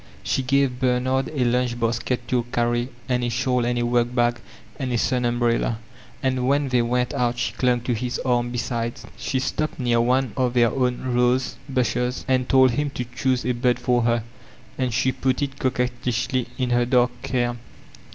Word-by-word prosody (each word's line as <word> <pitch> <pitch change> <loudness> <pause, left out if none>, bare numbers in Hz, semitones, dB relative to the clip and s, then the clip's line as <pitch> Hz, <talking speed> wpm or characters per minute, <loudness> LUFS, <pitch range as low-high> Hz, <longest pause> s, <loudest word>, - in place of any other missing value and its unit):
She - - 0
gave 130 -1 +1
Bernard 130 +1 +1
a 135 -5 0
lunch 120 0 0
basket 120 +1 -1
to 125 -2 +2
carry 120 +1 0 0.2
and 125 -1 0
a - - +1
dmml 125 0 0
and 120 - -1
a 120 - +1
workbag 120 0 +1 0.4
and 130 -2 -2
a 120 - +1
sun 125 +1 +1
umbrella, 120 -1 +1 0.5
and 130 -1 0
when 140 0 +2
they 125 -1 +3
went 125 +1 0
out 120 -1 0
she 120 - -1
clung 125 -2 +1
to 120 +1 -1
his 125 +2 -2
arm 120 -1 +1
besides. 120 0 -3
She 135 - -2
stopped 155 +4 -2
near 120 -2 +2
one 125 -1 +1
of 125 -1 0
their 120 -2 +4
own 125 -1 -1
rose 125 +1 +2
bushes 125 -1 -1
and 130 -1 +1
told 130 -2 +6
him 145 +4 -1
to 125 - -2
choose 125 +2 0
a 125 - +2
bod 125 0 +1
for 125 0 +1
her, 115 -1 +1 0.5
and 130 -2 -1
she 130 +3 +2
put 130 +2 0
it 140 -1 -4
coquettishly 125 -1 -1
in 125 -2 -1
her 120 0 +2
dark 125 -1 +2
hair. 120 -2 0
125 Hz, 185 wpm, -23 LUFS, 120-130 Hz, 0.5 s, told